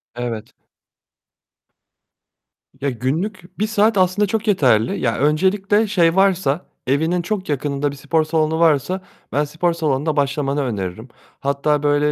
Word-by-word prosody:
Evet. 120 -3 -5 2.3
Ya, 140 - 0
günlük 165 - -4
bir 215 - +1
saat 215 0 +2
aslında 185 +2 +3
çok 220 +2 -2
yeterli. 125 - +2
Ya, 115 -3 0
öncelikle 195 +8 +2
şey 175 -5 +2
varsa, 185 -5 +2 0.2
evinin 160 +6 +1
çok 190 -1 -3
yakınında 145 0 -1
bir - - -9
spor 145 +3 0
salonu 155 0 0
varsa 165 +3 +2 0.3
ben 145 - +1
spor 165 +4 -1
salonunda 155 -2 -1
başlamanı 140 0 0
öneririm. 105 -2 -4 0.3
Hatta 140 +1 0
böyle 145 0 +2
155 Hz, 130 wpm, -20 LUFS, 140-185 Hz, 2.3 s, aslında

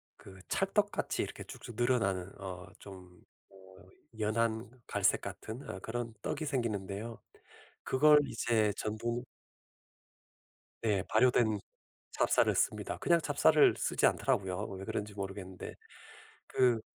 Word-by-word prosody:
그 95 -1 -14
찰떡같이 - - 0
이렇게 - - -5
쭉쭉 120 - -10
늘어나는 105 -7 +1
어 95 -1 -7
좀 90 -3 -12 0.3
어 95 - -20 0.6
연한 110 +1 0 0.2
갈색 - - +2
같은 115 +5 -7
어 95 - -5
그런 115 +2 -4
떡이 155 - -3
생기는데요 110 -5 -3 0.6
그걸 150 +3 +6
이제 110 -4 +1
전분 115 +3 -2 1.6
네 105 -4 +2
발효된 110 -2 +3 0.5
찹쌀을 - - +3
씁니다. - - 0
그냥 170 -1 +3
찹쌀을 - - +5
쓰지 - - +2
않더라고요 95 -1 +1 0.2
왜 95 - -6
그런지 105 0 -3
모르겠는데. 95 -2 -6 0.7
그 120 -3 +3
110 Hz, 250 characters per minute, -32 LUFS, 95-120 Hz, 1.6 s, 그걸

